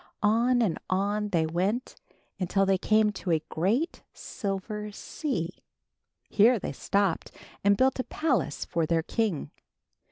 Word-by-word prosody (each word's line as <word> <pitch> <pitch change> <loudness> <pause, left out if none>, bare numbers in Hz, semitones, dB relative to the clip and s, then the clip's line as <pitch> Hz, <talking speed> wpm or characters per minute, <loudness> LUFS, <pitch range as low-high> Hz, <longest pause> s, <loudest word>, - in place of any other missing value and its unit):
On 235 +3 +3
and 185 -7 0
on 205 +2 0
they 165 -5 +2
went, 190 +10 -1 0.4
until 195 +1 +2
they 190 -1 +2
came 215 +1 +3
to 195 -2 -6
a 160 -2 +2
great 220 - 0
silver 210 +1 -4
sea. 190 - -4 0.7
Here 230 +4 +5
they - - -4
stopped 200 -4 0 0.3
and 200 0 +4
built 265 +2 +3
a - - +1
palace 260 - -1
for 165 -2 -1
their 165 -1 +1
king. 210 -5 -1
200 Hz, 135 wpm, -28 LUFS, 180-225 Hz, 0.7 s, Here